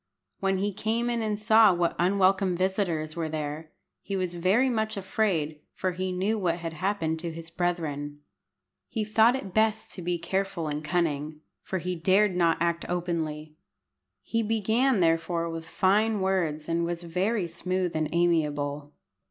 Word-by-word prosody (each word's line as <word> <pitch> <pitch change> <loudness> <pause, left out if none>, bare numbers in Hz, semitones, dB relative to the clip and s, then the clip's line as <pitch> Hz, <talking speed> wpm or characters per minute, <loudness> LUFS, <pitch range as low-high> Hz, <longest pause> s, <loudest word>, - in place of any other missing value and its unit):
When 195 0 +1
he 200 +2 -1
came 230 +4 -1
in 235 -1 -1
and 210 -1 -1
saw 220 -1 +6
what 175 -1 0
unwelcome 190 0 +3
visitors 180 -5 -1
were 165 -2 -2
there 155 0 -4 0.3
he 200 - -4
was 185 -2 -1
very 190 +9 +3
much 220 -3 -1
afraid, 185 -7 -1 0.2
for 185 - -1
he 185 +1 -3
knew 195 +5 0
what 170 -3 0
had 165 -1 -5
happened 165 -2 -1
to 170 0 -4
his 165 0 -9
brethren. 150 -5 -2 0.7
He 220 -3 -2
thought 220 +3 +4
it 200 -9 -6
best 220 +1 +1
to 185 - -7
be 175 0 -1
careful 190 0 -2
and 150 0 -3
cunning, 155 -2 -1 0.2
for 190 - -3
he 180 +1 -3
dared 190 +3 +3
not 170 -2 +3
act 170 0 0
openly. 160 -3 -3 0.7
He 230 - 0
began 225 +2 +2
therefore 165 0 +1
with 165 0 -6
fine 210 +4 +2
words, 175 -6 0
and 170 0 0
was 170 0 -3
very 185 +4 0
smooth 180 +1 -2
and 155 -1 0
amiable. 150 -4 0
180 Hz, 160 wpm, -27 LUFS, 165-200 Hz, 0.7 s, saw